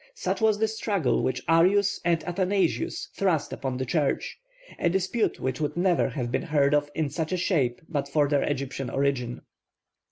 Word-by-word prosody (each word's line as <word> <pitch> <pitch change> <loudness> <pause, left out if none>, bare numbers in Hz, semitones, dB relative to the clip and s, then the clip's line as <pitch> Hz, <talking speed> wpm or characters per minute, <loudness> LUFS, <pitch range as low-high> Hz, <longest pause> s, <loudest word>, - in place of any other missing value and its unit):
Such - - -2
was 220 -1 +4
the 220 +1 +2
struggle 205 - 0
which 125 -1 -1
Arius 185 +5 +3
and 170 -2 +1
Athanasius 185 0 -1
thrust 180 -6 0
upon 130 -2 -3
the 130 - -2
Church; 145 - -1 0.4
a 170 - +2
dispute 190 +5 0
which 130 +2 -2
would 150 +1 -2
never 175 -1 +2
have 125 -5 -3
been - - 0
heard 145 -2 +2
of 145 0 +2
in 155 -3 -1
such 160 -1 -3
a 185 - 0
shape 145 -9 0
but 140 -3 -2
for 145 0 +2
their 145 -1 +2
Egyptian 135 -1 -2
origin. 135 -3 -1
155 Hz, 180 wpm, -26 LUFS, 140-185 Hz, 0.4 s, was